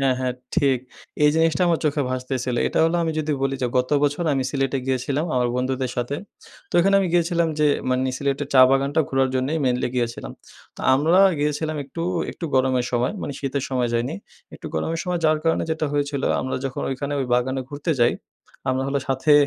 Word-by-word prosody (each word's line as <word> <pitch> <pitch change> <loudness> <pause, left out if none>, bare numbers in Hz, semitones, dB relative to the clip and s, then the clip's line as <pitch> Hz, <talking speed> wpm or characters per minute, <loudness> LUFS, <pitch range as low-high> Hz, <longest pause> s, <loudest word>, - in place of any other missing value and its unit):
হ্যাঁ, 135 -2 +2
হ্যাঁ 125 -1 -1 0.2
ঠিক, 135 -3 +3 0.5
এই 150 - +6
জিনিসটা 165 +1 +2
আমার 165 - +2
চোখে 150 -1 +1
ভাসতেছিল। 130 -1 -2
এটা - - -1
হলো 165 +1 +2
আমি 160 -1 -1
যদি 155 0 -1
বলি 135 0 +1
যে, - - +2
গত 125 +2 -1
বছর 145 +4 +1
আমি 135 - 0
সিলেটে 135 -1 0
গিয়েছিলাম 135 +4 0
আমার 125 -1 +2
বন্ধুদের 130 0 -1
সাথে। 120 +4 -2 0.5
তো - - -12
এখানে 195 +3 +3
আমি 190 - 0
গিয়েছিলাম 170 -1 +2
যে, 150 - +4 0.2
মানে 130 0 +1
সিলেটের 140 0 -1
চা 130 - +8
বাগানটা 140 +3 +2
ঘোরার 135 -1 +2
জন্যেই 135 +5 0
মেইনলি 125 -1 +1
গিয়েছিলাম। 120 -1 -2 0.4
তো - - -9
আমরা 160 +7 +3 0.2
গিয়েছিলাম 150 +1 -1
একটু, 165 +5 -6 0.3
একটু - - -8
গরমের 130 -1 +2
সময়, 120 +6 +1
মানে - - -4
শীতের 140 0 -2
সময় 125 -2 0
যাইনি। 120 +2 -1 0.4
একটু - - -9
গরমের 165 - -1
সময় 180 -1 -1
যাওয়ার 155 -1 +3
কারণে 165 - +2
যেটা 160 -1 -1
হয়েছিল 145 -1 -1 0.2
আমরা 130 - -2
যখন 135 -1 -3
ঐখানে 140 +2 -3
ওই 130 - -1
বাগানে 130 +2 0
ঘুরতে 145 +3 -2
যাই, 120 - +4 0.6
আমরা 130 +1 0
হলো 140 0 0
সাথে 135 +3 +2
135 Hz, 195 wpm, -23 LUFS, 130-155 Hz, 0.6 s, চা